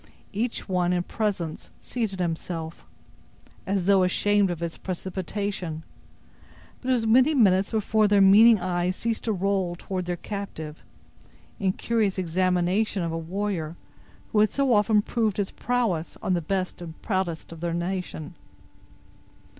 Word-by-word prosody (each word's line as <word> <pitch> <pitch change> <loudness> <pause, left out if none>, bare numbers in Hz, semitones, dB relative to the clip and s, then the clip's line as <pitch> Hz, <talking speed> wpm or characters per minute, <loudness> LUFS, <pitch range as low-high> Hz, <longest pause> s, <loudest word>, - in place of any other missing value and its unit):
Each 230 +4 -2
one 180 -2 +1
in 175 -1 0
presence 185 -7 -3
seated 220 -6 -3
himself, 165 -1 -4 0.8
as 190 -2 0
though 195 -1 +5
ashamed 200 +2 +3
of 175 -2 -3
his 170 -1 -3
precipitation; 185 -2 -4 1.0
but 260 - -4
it - - +5
was 230 -2 -1
many 255 +7 +5
minutes 195 -6 +4
before 215 -1 +2
their 205 0 +4
meaning 210 +3 +7
eyes 180 0 -1
ceased 230 +1 -2
to 225 - +1
roll 190 -2 0
toward 185 0 -4
their 175 0 -2
captive, 170 -6 -7 0.8
in 190 -2 +1
curious 220 -4 0
examination 185 +3 +1
of 165 - -2
a - - -3
warrior 175 -2 -3 0.6
who 210 - +2
had 215 0 +5
so 275 -3 +1
often 210 0 +4
proved 220 -4 0
his 200 -2 -1
prowess 225 -10 -1
on 185 - +1
the 175 - +1
best 185 +2 -2
and 160 -2 -9
proudest 185 -7 -2
of 165 - -9
their 170 0 -2
nation. 175 -2 -4
190 Hz, 145 wpm, -26 LUFS, 175-210 Hz, 1.0 s, meaning